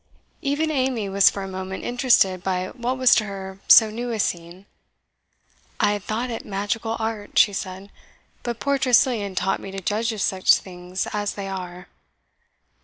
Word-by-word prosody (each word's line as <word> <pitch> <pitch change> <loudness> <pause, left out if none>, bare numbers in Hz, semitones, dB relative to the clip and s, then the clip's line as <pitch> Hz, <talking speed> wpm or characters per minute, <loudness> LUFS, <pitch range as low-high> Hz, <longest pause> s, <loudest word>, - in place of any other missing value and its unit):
Even 295 +3 0
Amy 255 -7 0
was 195 0 +5
for 200 - -5
a - - -5
moment 190 0 -6
interested 240 -7 +2
by 185 -1 -1
what 250 +1 -3
was 255 -2 +5
to 215 - +3
her 190 -1 -7
so 220 -2 +8
new 240 +3 -4
a 225 -2 -3
scene. 175 0 -3 1.1
"I - - +3
had 205 -2 -3
thought 235 +4 -3
it 230 - -5
magical 210 +3 -3
art," 220 -2 -4
she 205 - +5
said, 190 0 -6 0.5
"but 235 -1 -4
poor 280 -1 0
Tressilian 240 -6 +2
taught 190 +2 0
me - - -8
to 195 0 -6
judge 215 +5 -1
of 220 - -6
such 190 -1 +4
things 180 0 -5
as 205 -1 -2
they 200 -1 -5
are. 180 -1 -7
205 Hz, 175 wpm, -23 LUFS, 190-235 Hz, 1.1 s, so